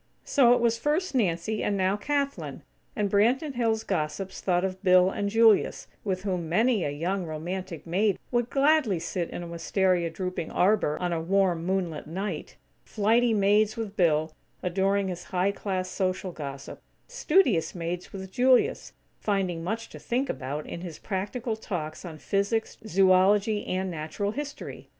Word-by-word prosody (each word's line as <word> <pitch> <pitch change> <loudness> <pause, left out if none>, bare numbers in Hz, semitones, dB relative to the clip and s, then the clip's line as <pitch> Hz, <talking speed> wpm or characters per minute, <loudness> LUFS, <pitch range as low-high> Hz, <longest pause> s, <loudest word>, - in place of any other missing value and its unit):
So 245 -4 +5
it - - 0
was 230 -1 +1
first 305 +8 0
Nancy, 210 -2 0
and 200 - 0
now 190 +1 +2
Kathlyn; 280 +5 -2 0.3
and 210 -4 +1
Branton 245 +9 +2
Hills' 225 -3 0
gossips 185 +2 -3
thought 180 -1 +1
of 190 0 -4
Bill 185 -1 +5
and 200 0 -2
Julius, 225 -1 +4 0.2
with 185 -2 -2
whom 180 -5 -2
many 220 +3 +2
a - - -1
young, 175 +7 -2
romantic 165 +2 -5
maid 195 +4 +1
would 240 -1 +1
gladly 275 - +3
sit 170 +1 -3
in 175 - -6
a - - -7
wistaria 175 +1 +1
drooping 180 -1 -4
arbor 185 -6 +2
on 180 -1 -1
a 165 - -1
warm, 180 -1 +1
moon 190 -2 0
lit 150 - -8
night; 185 0 -4 0.3
flighty 225 +3 +2
maids 210 +1 +3
with 215 -3 -4
Bill, 160 -3 +2 0.3
adoring 195 +2 +1
his 180 -1 -5
high 185 +1 +1
class 190 -2 -3
social 185 0 -2
gossip; 140 -4 -7 0.3
studious 345 - +2
maids 175 +1 -4
with 190 -1 -8
Julius, 250 +3 +2 0.3
finding 185 -5 -1
much 225 +6 -3
to - - -10
think 255 +3 -1
about 145 +3 -5
in 170 - -7
his 175 -3 -7
practical 220 +4 -3
talks 170 -8 -5
on 165 -4 -8
physics, 200 +6 -1
zoology, 195 +2 +3
and 185 0 -1
natural 165 +6 -3
history. 285 +3 -7
190 Hz, 160 wpm, -27 LUFS, 175-220 Hz, 0.3 s, So